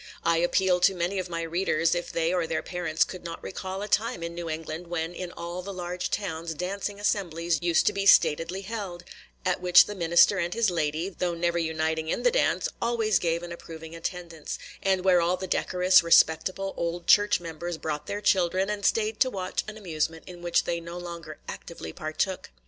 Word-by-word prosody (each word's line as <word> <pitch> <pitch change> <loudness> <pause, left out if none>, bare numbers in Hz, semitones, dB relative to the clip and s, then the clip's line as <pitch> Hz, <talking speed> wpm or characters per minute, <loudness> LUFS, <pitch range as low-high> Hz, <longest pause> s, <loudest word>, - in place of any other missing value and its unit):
I 170 0 +3
appeal 180 +2 +2
to 190 +2 +4
many 180 +3 -1
of 185 -1 -4
my 165 -1 -3
readers, 165 -1 +1
if 175 0 -3
they 165 +1 0
or 175 -3 0
their 160 - -2
parents 170 -3 0
could 185 -2 -8
not 170 -1 -7
recall 190 +1 -5
a - - -4
time 210 -5 0
in 170 0 -4
New 170 -1 -5
England 160 +2 -5
when 170 0 -3
in 175 0 -6
all 175 +1 -6
the 200 +2 -7
large 180 -1 -4
towns 165 -5 -3
dancing 200 +4 -4
assemblies 175 -5 0
used 170 -1 +3
to - - +3
be 200 0 -1
statedly 165 +2 +4
held, 195 -4 -6 0.4
at 180 0 0
which 180 -1 +7
the 210 - -6
minister 170 +2 +4
and 175 +2 -1
his 230 -4 +2
lady, 160 +1 -1
though 175 -2 -2
never 170 0 0
uniting 160 -1 -1
in - - -1
the - - +4
dance, - - +1
always 230 -3 +2
gave 170 0 -1
an 175 - -7
approving 165 -1 -9
attendance, 170 -2 -5 0.2
and 190 -1 +1
where 180 -2 +5
all 175 +2 +1
the 190 - -5
decorous, 185 0 +4
respectable 170 +3 +3
old 170 +1 -3
church 205 0 +5
members 170 0 -5
brought 150 -2 -4
their 205 +1 -3
children, 190 0 +2
and 205 -1 -4
stayed 215 -1 0
to 260 - +4
watch 185 -5 -3
an 215 0 -7
amusement 160 -4 -3
in 175 -1 -10
which 175 -1 +2
they 170 0 -2
no 170 +1 -7
longer 170 -3 -7
actively 80 - -8
partook. 155 +4 -3
175 Hz, 200 wpm, -27 LUFS, 165-190 Hz, 0.4 s, which